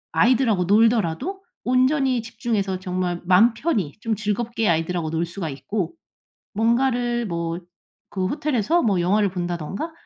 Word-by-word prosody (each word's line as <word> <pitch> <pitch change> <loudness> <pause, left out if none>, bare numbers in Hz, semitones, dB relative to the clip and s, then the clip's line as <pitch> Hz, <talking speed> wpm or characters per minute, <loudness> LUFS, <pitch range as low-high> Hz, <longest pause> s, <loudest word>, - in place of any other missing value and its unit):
아이들하고 220 0 +3
놀더라도 225 - +2 0.2
온전히 255 0 +2
집중해서 220 -4 -2
정말 180 -1 -2
맘 200 +6 +5
편히 225 - -1
좀 225 0 -1
즐겁게 220 +1 -1
아이들하고 165 0 0
놀 165 +1 -1
수가 170 -1 -5
있고 180 +6 -3 0.6
뭔가를 240 +2 +1
뭐 170 -1 -3 0.5
그 185 -2 0
호텔에서 295 - +1
뭐 200 -6 +2
영화를 200 +3 +2
본다든가 175 - -4
210 Hz, 310 characters per minute, -23 LUFS, 180-240 Hz, 0.6 s, 맘